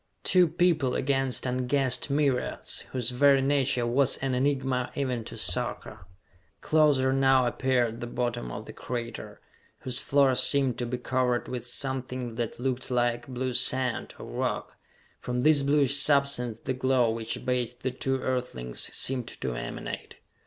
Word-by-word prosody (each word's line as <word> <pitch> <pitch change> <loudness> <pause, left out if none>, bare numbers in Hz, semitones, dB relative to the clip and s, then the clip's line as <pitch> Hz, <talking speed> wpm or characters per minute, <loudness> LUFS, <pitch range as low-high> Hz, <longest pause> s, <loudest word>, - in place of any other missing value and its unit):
Two 180 -2 +5
people 160 -5 +1
against 135 -2 0
unguessed 130 +1 0
myriads, 140 -3 0
whose 125 -2 -1
very 140 +2 +4
nature 135 -3 +1
was 130 +3 +2
an 135 -1 -2
enigma, 130 -1 0
even 130 -4 -2
to - - -6
Sarka. 90 - -3 0.5
Closer 145 -4 +3
now 135 -1 +4
appeared 120 -2 0
the 120 - -4
bottom 120 - -3
of - - -7
the - - -10
crater, 115 -2 -6 0.4
whose 130 0 0
floor 140 -1 +3
seemed 130 -1 +3
to 120 - -2
be 125 +1 -3
covered 125 -1 0
with 125 -1 -5
something 130 -1 -3
that 115 0 -4
looked 130 0 -2
like 120 -1 0
blue 130 0 -3
sand, 130 -1 +1
or - - -9
rock. - - -3 0.4
From 125 0 -3
this 150 -1 +5
bluish 140 -1 +2
substance 140 -5 +3
the 130 - -3
glow 130 -2 +2
which 115 0 -4
bathed 125 -1 -2
the 130 - 0
two 135 +1 -2
Earthlings 120 - -3
seemed 125 -3 0
to 65 - -4
emanate. - - -6
130 Hz, 150 wpm, -27 LUFS, 120-135 Hz, 0.5 s, Two